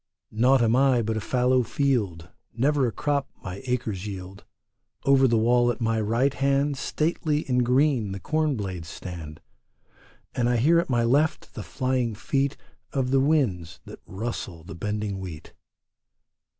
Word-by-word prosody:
Naught 125 +3 +3
am 115 +1 +3
I 130 -2 +3
but 110 +1 -1
a 110 - -2
fallow 125 +3 +2
field; 110 - -1 0.3
Never 135 +2 +2
a - - -2
crop 145 +3 -1
my 95 +4 -6
acres 110 -6 -2
yield. 95 -1 -8 0.6
Over 135 -1 +5
the 115 -2 +2
wall 120 +2 +3
at 120 - -2
my 115 -1 0
right 120 +6 +1
hand 140 +1 +1
Stately 155 -1 -1
and 125 -1 +2
green 125 -4 +2
the 100 - -5
corn 155 +4 0
blades 95 -7 -5
stand, 80 -3 -8 0.9
And 120 0 +1
I 120 - +2
hear 160 +8 +4
at 170 - -2
my 120 -2 +2
left 145 +7 +1
the - - -6
flying 125 -4 -1
feet 140 +4 -1 0.3
Of 130 -2 -1
the 135 - +4
winds 125 - 0
that - - -11
rustle 95 -5 -5
the 80 - -9
bending 105 +2 -3
wheat. 85 -5 -9
120 Hz, 160 wpm, -25 LUFS, 105-135 Hz, 0.9 s, Over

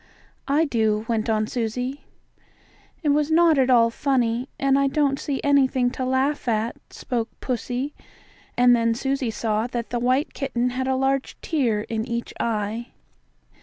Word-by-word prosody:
"I 300 +3 +3
do," 220 -5 0
went 225 -1 -1
on 215 -1 +1
Susie. 250 +4 -3 1.0
"It 300 - +1
was 295 +1 +2
not 325 -2 +4
at 260 -1 +3
all 230 -2 +5
funny, 250 -1 0
and 275 0 +2
I 275 - +3
don't 275 -1 +1
see 280 -3 -2
anything 265 -3 +3
to 260 - -4
laugh 260 +2 0
at," 225 0 0 0.2
spoke 235 -4 -3
pussy, 255 +3 -3 0.6
and 245 0 +6
then 230 -1 +1
Susie 270 0 -1
saw 220 0 -1
that 240 -1 -5
the 240 - 0
white 255 +4 +1
kitten 250 -3 -1
had 260 +1 -2
a 265 - +1
large 270 0 -1
tear 245 -10 0
in 220 +1 -3
each 235 0 -4
eye. 220 +1 -2
250 Hz, 160 wpm, -23 LUFS, 230-275 Hz, 1.0 s, and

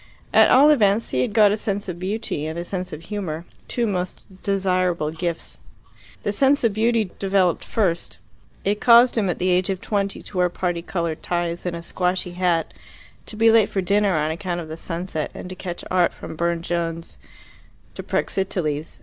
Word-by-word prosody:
At - - +7
all 285 +4 +7
events 215 -5 +2
he 130 - +1
had 130 - 0
got 210 -2 +5
a - - +2
sense 205 -2 -3
of 175 -2 -5
beauty 190 -5 -3
and 160 +1 -5
a 170 - -4
sense 185 0 -4
of 155 +2 -8
humour, 175 -6 -4 0.2
two 240 - -1
most 185 -1 -4
desirable 185 -5 0
gifts. 165 0 -4 0.6
The 205 - 0
sense 275 +5 +3
of 225 -3 +3
beauty 220 -2 +1
developed 190 -3 +2
first. 180 -6 -1 0.5
It 205 +1 0
caused 240 +1 +7
him 210 -5 +1
at 175 - -1
the 185 - 0
age 180 +2 +2
of 190 -1 -1
twenty 200 -1 -2
to 190 - -8
wear 180 0 +3
parti 175 -1 -2
coloured 170 -2 -3
ties 175 0 -2
and 175 - -2
a 170 - -7
squashy 180 0 -1
hat, 175 -2 0 0.5
to - - -6
be 225 +1 +5
late 220 -2 +5
for 195 - -2
dinner 200 0 +2
on 155 0 +1
account 175 +1 -3
of 160 -2 -7
the 160 - -5
sunset, 165 -2 -4
and - - -7
to 185 - -7
catch 175 -1 -6
art 180 -2 +2
from - - -8
Burne 170 0 -1
Jones 170 -1 -3 0.7
to - - -6
Praxiteles. 165 -6 -2
185 Hz, 190 wpm, -23 LUFS, 170-205 Hz, 0.7 s, At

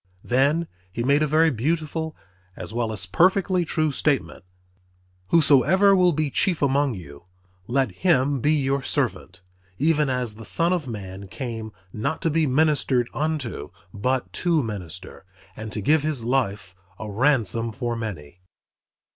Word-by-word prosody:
Then 140 +7 +2 0.3
He 115 +5 -3
made 140 +4 +3
a 155 - +2
very 160 +2 +3
beautiful 155 +5 -2 0.4
as - - -8
well 115 -1 -1
as 100 -3 -2
perfectly 185 - +2
true 155 -2 0
statement, 140 - -1 0.8
"Whosoever 165 - +5
will 180 -1 +4
be 155 -2 -1
chief 175 -1 0
among 140 -2 +2
you, 70 -4 -11 0.4
let 130 -2 +1
him 140 - +1
be 145 +5 +2
your 140 -2 0
servant; 120 -10 -2 0.4
even 150 0 +2
as 125 -4 -2
the 115 - -10
Son 170 - +1
of 165 -6 -2
man 100 -3 -7
came 115 0 -6 0.2
not 110 +9 -2
to 165 - +1
be 160 0 +2
ministered 135 -3 +1
unto, 145 - -3 0.2
but 125 +5 -2
to 170 -5 +2
minister, 95 -4 -8 0.3
and 110 0 -7
to 105 - -4
give 150 +9 +3
his 150 -5 -2
life 110 -8 -1 0.2
a 110 - -7
ransom 115 - +2
for 120 +2 -3
many." 90 -8 -7
135 Hz, 145 wpm, -24 LUFS, 110-155 Hz, 0.8 s, Whosoever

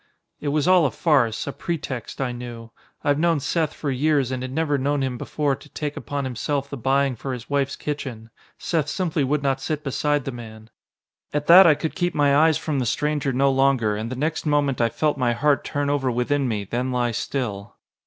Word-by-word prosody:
It 150 - -5
was 145 +1 +1
all 180 -4 +5
a - - -1
farce, 120 -4 +1
a 140 - -4
pretext, 145 -8 -5
I 130 -2 -1
knew. 120 -2 -8 0.3
I've 145 0 +2
known 165 -2 +2
Seth 155 +2 0
for 145 - -3
years 140 -1 +1
and 130 -1 -3
had 130 0 -5
never 145 -1 0
known 140 +1 0
him 130 -2 -2
before 145 +3 -1
to 145 +2 -16
take 150 0 -4
upon 145 -1 -4
himself 135 +2 -2
the - - -3
buying 135 +1 +1
for 130 +3 -5
his 125 +1 -8
wife's 140 -1 0
kitchen. 125 -7 -5 0.3
Seth 155 -4 -1
simply 160 -2 -1
would 145 +2 0
not 135 -1 0
sit 150 +2 -3
beside 145 0 0
the 135 - -3
man. 110 -2 -11 0.6
At 150 0 0
that 180 +3 +9
I 155 - +6
could 160 +2 -3
keep 175 -1 -1
my 145 -1 +3
eyes 160 0 +4
from 150 -4 -2
the 125 - -1
stranger 150 +2 0
no 135 +2 +2
longer, 130 -5 +2
and 110 +2 -4
the - - -3
next 155 +5 -2
moment 145 -4 +1
I 115 - +3
felt 150 +4 -1
my 120 -2 +2
heart 145 +4 +2
turn 145 -1 -2
over 140 -2 +1
within 125 +3 0
me, 105 -4 -2
then 125 +6 -2
lie 120 -1 0
still. 105 -4 -4
140 Hz, 215 wpm, -23 LUFS, 125-150 Hz, 0.6 s, that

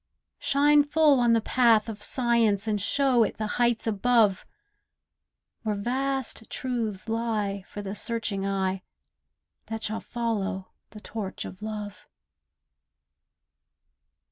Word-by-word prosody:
Shine 290 +1 +4
full 295 -2 +4
on 240 -1 +4
the 230 - +3
path 230 -2 +3
of 215 -2 -7
Science, 230 -4 +1
And 210 -2 0
show 260 +1 +3
it - - -3
the 215 - -2 0.2
heights 240 -1 +2
above, 220 -2 +2 1.1
Where 215 -2 -1
vast 260 +2 -1
truths 230 -6 -3
lie 220 -4 -1
for 205 - -7
the 195 0 -4
searching 215 -2 -2
eye 190 -1 -1 0.9
That 225 0 -5
shall 215 +1 -3
follow 205 -5 -3 0.2
the 210 - -12
torch 210 -4 -5
of 185 - -9
love. 210 -1 -6
225 Hz, 115 wpm, -27 LUFS, 205-240 Hz, 1.1 s, Shine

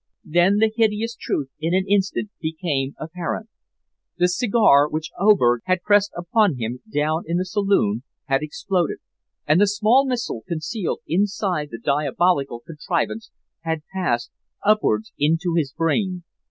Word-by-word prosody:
Then 175 +5 +3
the 220 +1 +3
hideous 225 0 +1
truth 135 -2 -3
in 165 +3 0
an 190 0 +1
instant 200 +1 0
became 155 -4 -2
apparent. 175 +7 -5 0.7
The 180 0 +3
cigar 180 - +4
which 155 +1 -4
Oberg 150 - +4
had 185 -1 0
pressed 205 -1 +3
upon 175 - +2
him 120 +1 -4
down 155 +1 0
in 170 +1 0
the 185 - -1
saloon 185 - +1 0.2
had 135 -1 +1
exploded, 170 +3 -1 0.5
and 155 +6 +4
the 205 - +5
small 220 +7 +3
missile 235 - -2
concealed 170 +4 -3
inside 185 -3 0
the 115 - -7
diabolical 140 -1 0
contrivance 170 +7 -3 0.3
had 160 -1 -3
passed 120 -11 -1 0.3
upwards 200 - +2
into 165 +4 +1
his 150 -5 0
brain. 180 +3 -1
175 Hz, 140 wpm, -22 LUFS, 150-205 Hz, 0.7 s, the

